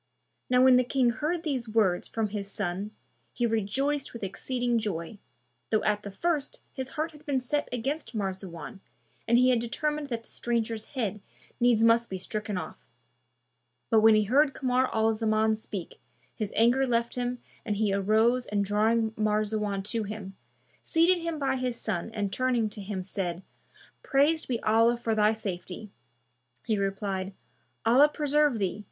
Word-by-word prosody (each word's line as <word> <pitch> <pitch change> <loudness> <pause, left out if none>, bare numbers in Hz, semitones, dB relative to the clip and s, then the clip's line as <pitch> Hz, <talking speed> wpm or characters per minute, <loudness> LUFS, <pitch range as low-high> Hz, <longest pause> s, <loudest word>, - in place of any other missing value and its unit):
Now 250 0 +5
when 260 -1 +7
the 250 - +4
King 250 -1 +2
heard 315 +8 -2
these 260 -8 -2
words 210 -5 +2
from 220 -2 -2
his 200 -1 -5
son, 195 +1 -3 0.4
he 240 - 0
rejoiced 260 +6 0
with 235 - -8
exceeding 240 +5 -1
joy, 200 -2 -4 0.5
though 215 - +1
at 210 -1 +1
the 205 - -7
first 295 - -2
his 260 -1 -5
heart 315 +2 -1
had 300 -1 -16
been 280 -3 0
set 290 +4 -2
against 250 0 -3
Marzawan 190 -1 -5 0.5
and 235 +1 +5
he 255 +1 +5
had 245 - +3
determined 295 +5 -2
that 235 -3 -4
the - - -19
stranger's 230 -2 -2
head 210 -4 -2 0.4
needs 240 -2 +4
must 230 +1 +4
be 190 - -3
stricken 210 +1 -4
off: - - -7 1.1
but 225 - +6
when 220 0 +7
he 215 - +4
heard 275 +6 +3
Kamar 255 0 +1
al 220 0 +2
Zaman 220 0 +2
speak, 200 -4 -8 0.3
his 215 -2 -4
anger 245 +4 +4
left 235 -1 0
him 245 0 -2 0.3
and 210 -3 -2
he 205 -1 +1
arose 220 +5 +2
and 205 -1 0
drawing 220 +2 +2
Marzawan 210 -2 -1
to 220 +3 -1
him, 200 -2 -6 0.5
seated 345 +2 +3
him 335 -1 -3
by 270 -2 0
his 250 -2 -2
son 200 -2 -3
and 205 -2 -2
turning 245 -4 +1
to 210 0 -8
him 195 -1 -4
said, 180 -1 -3 0.6
"Praised 300 +3 +2
be 240 -3 -1
Allah 230 +2 +4
for 230 -1 -1
thy 215 0 +4
safety!" 195 -1 -6 0.7
He 220 - +1
replied, 195 -1 -2 0.5
"Allah 265 +6 +6
preserve 295 -3 +2
thee! 195 -1 -1
225 Hz, 165 wpm, -28 LUFS, 210-255 Hz, 1.1 s, when